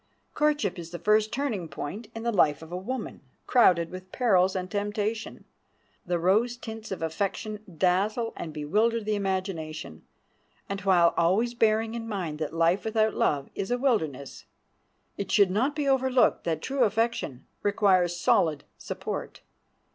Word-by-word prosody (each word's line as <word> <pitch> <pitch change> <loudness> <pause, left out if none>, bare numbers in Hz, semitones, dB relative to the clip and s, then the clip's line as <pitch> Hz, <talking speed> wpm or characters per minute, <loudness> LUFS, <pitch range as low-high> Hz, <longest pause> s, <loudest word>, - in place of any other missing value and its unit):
Courtship 295 - +1
is 170 -1 -7
the 175 - -6
first 215 +5 +2
turning 235 -10 -2
point 160 +9 -6
in 225 - -5
the 235 - +1
life 160 -7 +2
of 160 - -12
a - - -3
woman, 220 +6 -5 0.2
crowded 175 -9 +4
with 185 0 -9
perils 190 -7 +3
and 185 -1 -2
temptation. 210 +2 -3 0.6
The 175 0 +1
rose 215 +8 +2
tints 225 -2 -8
of 190 - -4
affection 200 +6 -2 0.2
dazzle 200 +7 +1
and 160 - -6
bewilder 210 +10 +1
the 215 0 -1
imagination, 185 - -3 0.7
and 195 0 -4
while 175 -3 +4
always 200 +8 +2
bearing 225 -1 +2
in 230 -1 -5
mind 175 -8 -4
that 155 - -2
life 165 +3 +2
without 220 -1 +1
love 140 -2 0
is 195 - -4
a 245 - +1
wilderness, 160 - -1 0.7
it 200 -2 -4
should 200 -3 +5
not 255 +9 +1
be 295 -2 -1
overlooked 260 -1 +3
that 160 -2 -1
true 270 -1 +1
affection 220 - -1 0.2
requires 185 -4 +2
solid 155 -4 +2 0.2
support. - - -5
200 Hz, 155 wpm, -27 LUFS, 175-225 Hz, 0.7 s, should